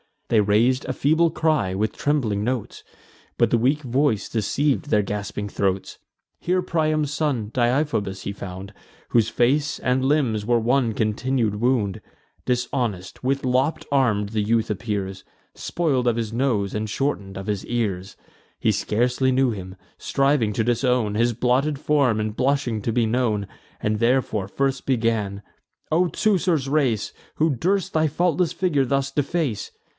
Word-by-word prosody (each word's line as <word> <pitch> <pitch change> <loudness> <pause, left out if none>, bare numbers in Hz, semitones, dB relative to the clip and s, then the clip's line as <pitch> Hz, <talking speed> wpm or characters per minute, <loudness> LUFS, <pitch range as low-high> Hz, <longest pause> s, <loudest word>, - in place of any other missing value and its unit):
They 115 - +4
rais'd 115 +6 +2
a - - -2
feeble 160 +4 +3
cry, 155 - 0
with 105 +3 0
trembling 120 -9 0
notes; 125 -1 -3 0.5
But - - +3
the 120 - +4
weak 135 +6 +1
voice 125 -3 0
deceiv'd 135 +7 0
their 105 -8 +2
gasping 105 +1 -4
throats. 95 -1 -2 0.4
Here 180 +1 +1
Priam's 155 -4 0
son, 140 -8 -1
Deiphobus, 120 -6 0
he - - -3
found, 100 0 -8 0.4
Whose 115 -2 +3
face 145 +5 +1
and 130 +1 0
limbs 130 -7 +1
were 120 +1 +3
one 120 0 +1
continued 110 +1 0
wound: 115 -5 +1 0.4
Dishonest, 120 -7 -2
with 135 +1 0
lopp'd 130 +5 +1
arms, 105 -7 +2
the 110 -1 0
youth 110 +1 +1
appears, 100 -3 -4 0.3
Spoil'd 140 -8 -1
of 120 - +3
his 115 -2 -2
nose, 115 -6 0
and 105 0 -2
shorten'd 105 -6 -2
of 95 +1 -7
his 105 -2 -2
ears. 100 -5 -2 0.4
He - - +2
scarcely 125 +4 +1
knew 130 -1 +3
him, 95 -3 -7 0.2
striving 135 -6 +1
to 110 - 0
disown 120 -2 +1
His 120 +3 +2
blotted 130 +5 +1
form, 135 -7 +2
and 105 0 -3
blushing 130 -4 0
to 115 - -1
be 120 -1 +2
known; 110 -3 0 0.3
And 105 0 0
therefore 115 -4 +1
first 135 +5 -1
began: 110 -5 0 0.5
"O 175 +3 +3
Teucer's 175 -8 +1
race, 135 -8 +1 0.2
Who 160 -1 +2
durst 185 - 0
thy 155 0 +3
faultless 175 +2 +1
figure 150 -8 +1
thus 135 +1 0
deface? 145 -4 -1
120 Hz, 150 wpm, -23 LUFS, 105-140 Hz, 0.5 s, They